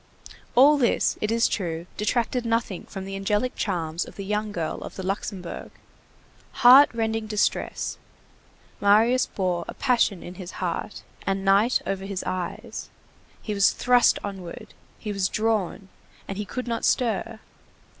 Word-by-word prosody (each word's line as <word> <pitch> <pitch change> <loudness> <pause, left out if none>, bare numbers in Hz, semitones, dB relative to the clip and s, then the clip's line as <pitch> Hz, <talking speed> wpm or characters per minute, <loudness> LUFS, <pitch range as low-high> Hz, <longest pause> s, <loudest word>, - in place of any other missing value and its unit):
All 285 +4 +7
this, 240 - +2
it 215 - 0
is 230 0 +3
true, 170 -4 -3
detracted 235 +3 0
nothing 230 -5 -1
from 190 -1 -7
the 195 0 -6
angelic 210 +5 0
charms 170 -4 -2
of - - -12
the 200 - -6
young 210 +1 -1
girl 165 -5 -3
of - - -8
the 190 - -6
Luxembourg. 190 -2 -4 1.0
Heart 265 +4 +10
rending 225 -1 -1
distress; 210 -1 -1 0.8
Marius 225 +5 +4
bore 180 -3 -1
a - - -7
passion 240 -8 +1
in 175 - -8
his 180 - -8
heart, 180 +3 -4 0.2
and 195 0 -1
night 200 +6 +4
over 195 0 -3
his 195 -1 -4
eyes. 180 -2 -5 0.5
He 215 - -3
was 200 -1 +4
thrust 245 -1 +4
onward, 190 -4 -7 0.2
he 210 - -5
was 190 -2 0
drawn, 215 -3 -1 0.4
and 195 +1 -5
he 210 - -2
could 250 +4 -5
not 230 -1 -2
stir. 225 -2 0
205 Hz, 150 wpm, -25 LUFS, 190-230 Hz, 1.0 s, Heart